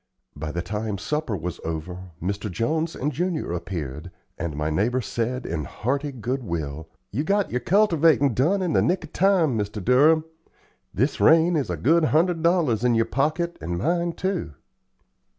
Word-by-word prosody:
By 75 +1 -5
the 85 +2 -3
time 105 +2 -3
supper 150 0 -2
was 90 +1 -5
over, 90 +3 -5
Mr. 100 +4 -3
Jones 155 - -1
and 145 +3 -1
Junior 170 - -2
appeared, 85 -3 -5 0.3
and 80 -2 -4
my 75 +1 -1
neighbor 115 +10 +1
said 120 +2 -3
in 80 -3 -3
hearty 140 - -2
good 130 +1 -3
will: 80 -4 -4 0.2
"You 135 +9 -1
got 200 +4 +1
your 125 - 0
cultivatin' 165 - +3
done 175 - +2
in 175 -4 0
the - - +4
nick 180 0 +1
of 160 - -11
time, 180 -8 +3
Mr. 105 0 -2
Durham. 155 +6 +5 0.7
This 130 +8 0
rain 165 +2 +5
is 145 -4 0
a - - -2
good 165 +3 +3
hundred 165 +2 +2
dollars 165 - +2
in 120 -1 +3
your 115 0 +3
pocket 155 +8 -1
and 85 +2 -3
mine, 170 - 0
too." 185 - -3
125 Hz, 170 wpm, -24 LUFS, -, 0.7 s, Durham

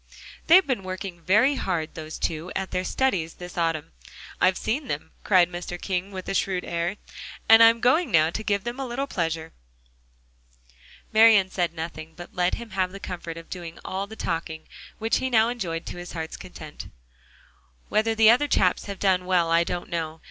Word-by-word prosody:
"They've 370 +3 +7
been 260 -7 -1
working 185 -1 -6
very 210 - +4
hard, 170 - -2
those 155 -1 -7
two, 165 +2 -3
at 190 0 -3
their 185 - -1
studies 185 -8 0
this 180 0 -9
autumn. 165 -3 -1 0.5
I've 185 0 +4
seen 260 +6 -2
them," 150 -2 -4
cried 185 -4 +5
Mr. 175 0 -6
King 185 +1 -2
with 185 -1 -7
a - - -2
shrewd 190 -2 0
air, 170 +3 -2 0.5
"and 225 0 +8
I'm 230 0 +7
going 310 +8 +3
now 160 -1 +4
to 215 - -4
give 200 -2 0
them 240 +4 -5
a 270 - -2
little 260 +3 -2
pleasure." 165 - -3 1.6
Marian 215 -4 +6
said 175 -2 -1
nothing, 160 -1 -6
but 175 - -11
let 180 0 +1
him 235 -2 -9
have 185 -1 0
the 195 - -9
comfort 170 -3 -6
of 165 - -10
doing 170 -2 -7
all 195 +1 -3
the 220 - -10
talking, 165 -4 -4 0.3
which 225 +1 +1
he 260 - -1
now 225 -2 +4
enjoyed 175 -9 -4
to - - -7
his 175 0 -8
heart's 160 -1 -5
content. 155 -4 -10 1.0
"Whether 225 +1 +1
the 220 0 +7
other 255 +5 +3
chaps 185 -9 +2
have 200 -1 -6
done 185 -1 +2
well, 175 -3 +2
I 165 +1 +4
don't 175 0 -4
know. 165 -1 -4
185 Hz, 190 wpm, -25 LUFS, 170-220 Hz, 1.6 s, and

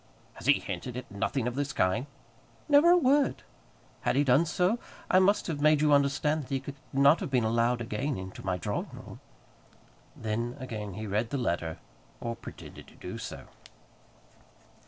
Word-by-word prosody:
"He - - +6
has - - -6
hinted 125 -1 -5
at 125 -4 -8
nothing 115 +5 -1
of 125 - -2
this 145 +2 -2
kind?" 110 +9 +1 0.6
"Never 295 +3 +6
a 355 - +7
word. 280 -2 +2 0.6
Had - - +1
he 140 - +4
done 140 +5 +4
so, 180 +7 +1 0.3
I 185 - +6
must 200 +2 +3
have 155 -4 -3
made 155 0 +5
you 150 0 +4
understand 145 +2 +2
that 135 - -11
he 135 - 0
could 135 +1 -7 0.2
not 140 +4 +5
have 185 - -4
been 125 -3 +2
allowed 115 +2 +1
again 120 +5 -2
into 95 0 -8
my 95 -1 -1
drawing 100 +3 -3
room." - - -10 1.0
Then 115 +3 -3
again 105 -6 -6
he 110 +1 -5
read 105 +3 -1
the 140 - -2
letter, 85 -9 -1 0.4
or 115 0 -3
pretended - - -11
to - - -17
do - - -7
so. - - -7
130 Hz, 175 wpm, -29 LUFS, 110-150 Hz, 1.0 s, a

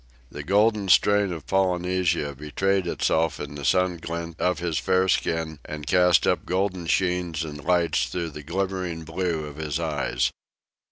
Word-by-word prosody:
The - - -6
golden 105 0 +2
strain 100 0 +4
of 80 -5 -6
Polynesia 90 -4 0
betrayed 90 +7 -1
itself 80 -3 0
in - - -6
the 70 -1 -7
sun 90 +2 +2
gilt 85 +1 -5
of 90 -2 +1
his 85 -2 -1
fair 95 0 +2
skin 80 -3 0
and 75 -1 -7
cast 90 +2 +4
up - - +1
golden 90 -2 -1
sheens 90 -3 0
and 75 -2 -7
lights 85 -8 +2
through 85 +5 -4
the 75 - -8
glimmering 90 0 -3
blue 80 -1 -2
of 75 -1 -9
his 75 -1 -3
eyes. 80 -3 -1
85 Hz, 160 wpm, -25 LUFS, 80-95 Hz, -, strain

